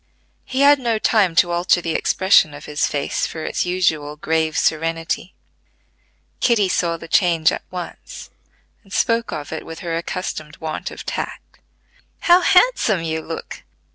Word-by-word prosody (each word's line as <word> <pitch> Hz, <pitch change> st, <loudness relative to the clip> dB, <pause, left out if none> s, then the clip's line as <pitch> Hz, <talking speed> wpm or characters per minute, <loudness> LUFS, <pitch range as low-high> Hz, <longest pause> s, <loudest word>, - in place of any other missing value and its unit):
He 265 Hz, +1 st, -2 dB
had 285 Hz, 0 st, +6 dB
no 235 Hz, -3 st, 0 dB
time 210 Hz, -6 st, +2 dB
to 175 Hz, 0 st, +4 dB
alter 175 Hz, +1 st, +2 dB
the 165 Hz, -2 st, -3 dB
expression 190 Hz, -6 st, +3 dB
of 145 Hz, -, -11 dB
his 150 Hz, 0 st, 0 dB
face 145 Hz, -1 st, -2 dB
for 160 Hz, -, -6 dB
its -, -, -2 dB
usual 160 Hz, -5 st, 0 dB
grave 160 Hz, +1 st, -1 dB
serenity: 165 Hz, +3 st, -1 dB, 1.0 s
Kitty 225 Hz, -5 st, +3 dB
saw 170 Hz, -2 st, 0 dB
the 165 Hz, -, -11 dB
change 165 Hz, -3 st, +3 dB
at -, -, -4 dB
once, 180 Hz, -1 st, -8 dB, 0.5 s
and 195 Hz, -, -22 dB
spoke 230 Hz, +1 st, +1 dB
of 145 Hz, -1 st, -6 dB
it 160 Hz, -, -5 dB
with 165 Hz, 0 st, -9 dB
her 170 Hz, -2 st, -3 dB
accustomed 165 Hz, -3 st, -5 dB
want 155 Hz, -1 st, -5 dB
of -, -, -10 dB
tact. -, -, -6 dB, 0.6 s
"How 350 Hz, +1 st, +5 dB
handsome 360 Hz, -, +3 dB
you 160 Hz, -1 st, -2 dB
look! 165 Hz, 0 st, -7 dB
170 Hz, 155 wpm, -20 LUFS, 160-200 Hz, 1.0 s, had